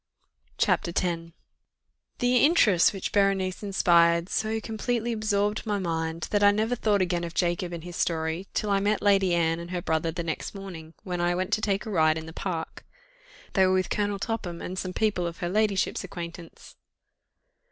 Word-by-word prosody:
CHAPTER 180 Hz, -, +2 dB
X 170 Hz, -2 st, -1 dB, 0.9 s
The 245 Hz, 0 st, +2 dB
interest 240 Hz, -, +5 dB
which 195 Hz, -2 st, -4 dB
Berenice 195 Hz, -2 st, +1 dB
inspired, 170 Hz, -3 st, +3 dB
so 220 Hz, 0 st, -1 dB
completely 230 Hz, +2 st, -2 dB
absorbed 210 Hz, -1 st, 0 dB
my 210 Hz, -2 st, -1 dB
mind, 165 Hz, -2 st, -2 dB
that 205 Hz, -, +2 dB
I 205 Hz, -, +7 dB
never 220 Hz, +4 st, +1 dB
thought 205 Hz, -4 st, +2 dB
again 175 Hz, -1 st, -1 dB
of 170 Hz, 0 st, -6 dB
Jacob 175 Hz, 0 st, 0 dB
and 170 Hz, -2 st, -6 dB
his 175 Hz, 0 st, -8 dB
story, 160 Hz, +2 st, -1 dB
till 210 Hz, -, 0 dB
I 200 Hz, -, +3 dB
met 205 Hz, +1 st, 0 dB
Lady 195 Hz, -3 st, +4 dB
Anne 165 Hz, -1 st, +1 dB
and 170 Hz, 0 st, -8 dB
her 180 Hz, -1 st, -3 dB
brother 160 Hz, +1 st, 0 dB
the 170 Hz, +1 st, -4 dB
next 165 Hz, +4 st, -4 dB
morning, 170 Hz, -5 st, -9 dB
when 180 Hz, -2 st, -3 dB
I 175 Hz, 0 st, +1 dB
went 185 Hz, +3 st, -2 dB
to 215 Hz, -, +2 dB
take 200 Hz, 0 st, 0 dB
a 220 Hz, -, -5 dB
ride 160 Hz, -4 st, +3 dB
in 160 Hz, -, -6 dB
the 160 Hz, -, -9 dB
park: 165 Hz, -3 st, -5 dB, 0.7 s
they 190 Hz, -2 st, +4 dB
were 185 Hz, -, +2 dB
with 185 Hz, -1 st, 0 dB
Colonel 205 Hz, -1 st, 0 dB
Topham, 195 Hz, -5 st, -4 dB
and 185 Hz, +1 st, -5 dB
some 185 Hz, -, -3 dB
people 200 Hz, -5 st, 0 dB
of 170 Hz, -, -6 dB
her 175 Hz, -3 st, -3 dB
ladyship's 205 Hz, -1 st, +1 dB
acquaintance. 170 Hz, -2 st, -9 dB
185 Hz, 185 wpm, -27 LUFS, 170-205 Hz, 0.9 s, I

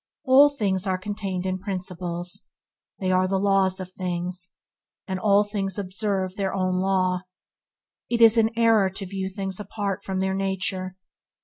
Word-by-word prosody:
All 280 Hz, +1 st, +7 dB
things 200 Hz, -8 st, -1 dB
are 185 Hz, -1 st, +1 dB
contained 190 Hz, -1 st, -4 dB
in 185 Hz, 0 st, -1 dB
principles. 180 Hz, -1 st, -5 dB, 0.5 s
They 185 Hz, -1 st, -1 dB
are 185 Hz, 0 st, +3 dB
the 195 Hz, +1 st, 0 dB
laws 195 Hz, -1 st, +2 dB
of 185 Hz, -1 st, -7 dB
things, 180 Hz, 0 st, -4 dB, 0.5 s
and 190 Hz, -1 st, -2 dB
all 205 Hz, 0 st, +4 dB
things 200 Hz, -2 st, -3 dB
observe 190 Hz, -1 st, -2 dB
their 195 Hz, -1 st, -1 dB
own 185 Hz, -1 st, 0 dB
law. 185 Hz, -1 st, +1 dB, 0.9 s
It 235 Hz, -, 0 dB
is 230 Hz, -1 st, +8 dB
an 225 Hz, -1 st, +4 dB
error 225 Hz, -4 st, +4 dB
to 195 Hz, +1 st, -6 dB
view 190 Hz, 0 st, -4 dB
things 195 Hz, 0 st, -4 dB
apart 200 Hz, -1 st, -3 dB
from 190 Hz, -1 st, -3 dB
their 190 Hz, 0 st, 0 dB
nature. 190 Hz, -1 st, -2 dB
190 Hz, 155 wpm, -25 LUFS, 185-200 Hz, 0.9 s, is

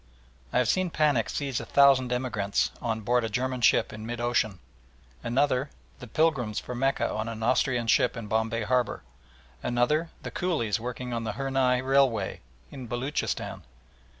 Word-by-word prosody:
I -, -, 0 dB
have 125 Hz, -2 st, +3 dB
seen 185 Hz, -1 st, +1 dB
panic 150 Hz, -8 st, +2 dB
seize 140 Hz, -4 st, -2 dB
a -, -, -5 dB
thousand 135 Hz, -3 st, +5 dB
emigrants 120 Hz, -6 st, 0 dB
on 110 Hz, -2 st, -2 dB
board 120 Hz, +3 st, +1 dB
a 115 Hz, -, -2 dB
German 125 Hz, +3 st, -2 dB
ship -, -, +3 dB
in 110 Hz, -, -8 dB
mid 120 Hz, +1 st, -5 dB
ocean; 120 Hz, -4 st, 0 dB, 0.7 s
another, 135 Hz, +2 st, +1 dB, 0.3 s
the 125 Hz, -, -9 dB
pilgrims 125 Hz, -5 st, +1 dB
for 125 Hz, -, -7 dB
Mecca 135 Hz, +3 st, +1 dB
on 110 Hz, +1 st, -3 dB
an 110 Hz, -1 st, -6 dB
Austrian 125 Hz, 0 st, +2 dB
ship 120 Hz, +2 st, +3 dB
in 115 Hz, -, -5 dB
Bombay 110 Hz, +1 st, 0 dB
Harbour; 125 Hz, +1 st, 0 dB, 0.6 s
another, 150 Hz, +7 st, +1 dB
the -, -, -5 dB
coolies 135 Hz, -, -1 dB
working 125 Hz, +1 st, -5 dB
on 115 Hz, -1 st, -2 dB
the 110 Hz, -2 st, -3 dB
Hurnai 130 Hz, 0 st, +1 dB
Railway 130 Hz, -7 st, +2 dB, 0.3 s
in 130 Hz, -3 st, -8 dB
Beloochistan. 125 Hz, +5 st, -3 dB
125 Hz, 160 wpm, -27 LUFS, 115-135 Hz, 0.7 s, thousand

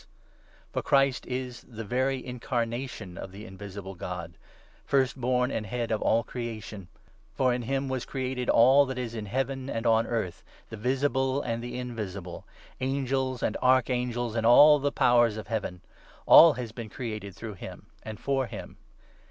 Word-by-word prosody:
His -, -, -25 dB, 0.7 s
For -, -, -1 dB
Christ 135 Hz, -1 st, +2 dB
is 125 Hz, -1 st, -4 dB
the 115 Hz, -2 st, -9 dB
very 130 Hz, +4 st, -1 dB
incarnation 120 Hz, -5 st, -4 dB
of 95 Hz, -, -7 dB
the 100 Hz, +3 st, -10 dB
invisible 95 Hz, -1 st, -8 dB
Pre -, -, -6 dB
eminence, 90 Hz, 0 st, -4 dB
God 85 Hz, 0 st, -8 dB, 0.3 s
— -, -, -30 dB
First 130 Hz, -1 st, 0 dB
born 125 Hz, +1 st, +1 dB
and 110 Hz, -4 st, -3 dB
Head 120 Hz, +2 st, -3 dB
of 110 Hz, -, 0 dB
all 115 Hz, +1 st, +2 dB
creation; 110 Hz, -5 st, -6 dB, 0.5 s
for 130 Hz, -2 st, +2 dB
in 125 Hz, -, -2 dB
him 135 Hz, +3 st, -2 dB
was 130 Hz, -2 st, -2 dB
created 130 Hz, -1 st, -3 dB
all 135 Hz, +4 st, +6 dB
that 130 Hz, -1 st, -4 dB
is 120 Hz, -2 st, -4 dB
in 110 Hz, -2 st, -5 dB
Heaven 135 Hz, +3 st, -2 dB
and 115 Hz, -1 st, -3 dB
on 115 Hz, 0 st, +3 dB
earth, 110 Hz, -7 st, -3 dB, 0.3 s
the -, -, -5 dB
visible 135 Hz, +3 st, 0 dB
and 115 Hz, -1 st, -3 dB
the 120 Hz, 0 st, -5 dB
invisible 100 Hz, -8 st, -6 dB, 0.2 s
— -, -, -24 dB
Angels 130 Hz, -1 st, -1 dB
and -, -, 0 dB
Archangels 125 Hz, -2 st, +1 dB
and 115 Hz, -, 0 dB
all 145 Hz, +6 st, +8 dB
the 140 Hz, +1 st, 0 dB
Powers 120 Hz, -3 st, +3 dB
of 110 Hz, -, -6 dB
Heaven. 100 Hz, -6 st, -3 dB, 0.4 s
All 165 Hz, -2 st, +9 dB
has 125 Hz, -4 st, -6 dB
been 115 Hz, -1 st, -7 dB
created 105 Hz, -5 st, -6 dB
through 110 Hz, -2 st, -7 dB
him 90 Hz, -, -10 dB, 0.2 s
and 110 Hz, -1 st, -8 dB
for 135 Hz, -2 st, 0 dB
him. -, -, -9 dB
120 Hz, 180 wpm, -28 LUFS, 110-130 Hz, 0.7 s, All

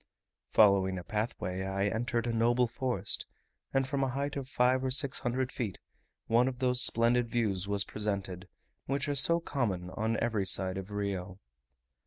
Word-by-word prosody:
Following 95 Hz, -3 st, +4 dB
a 90 Hz, -, -6 dB
pathway, 105 Hz, -3 st, -3 dB
I 95 Hz, +1 st, -1 dB
entered 115 Hz, +2 st, -1 dB
a 120 Hz, -, -1 dB
noble 120 Hz, +2 st, +3 dB
forest, 125 Hz, +1 st, -2 dB, 0.4 s
and 135 Hz, -1 st, +1 dB
from 140 Hz, -1 st, -1 dB
a 135 Hz, -, 0 dB
height 140 Hz, +3 st, -3 dB
of 135 Hz, -2 st, -5 dB
five 130 Hz, +1 st, +2 dB
or 130 Hz, -, 0 dB
six 135 Hz, +1 st, +1 dB
hundred 130 Hz, 0 st, -1 dB
feet, 110 Hz, -7 st, -4 dB, 0.5 s
one 120 Hz, +3 st, +3 dB
of 130 Hz, -1 st, -3 dB
those 125 Hz, 0 st, +2 dB
splendid 115 Hz, +1 st, +3 dB
views 105 Hz, -6 st, -1 dB
was 100 Hz, -1 st, +1 dB
presented, 100 Hz, -3 st, -4 dB, 0.4 s
which 140 Hz, +2 st, -1 dB
are 145 Hz, -, 0 dB
so 160 Hz, +5 st, +6 dB
common 100 Hz, -, -2 dB
on 110 Hz, +3 st, -1 dB
every 105 Hz, -5 st, 0 dB
side 95 Hz, +1 st, +1 dB
of 95 Hz, +1 st, -8 dB
Rio. 100 Hz, -2 st, -4 dB
115 Hz, 170 wpm, -31 LUFS, 100-130 Hz, 0.5 s, so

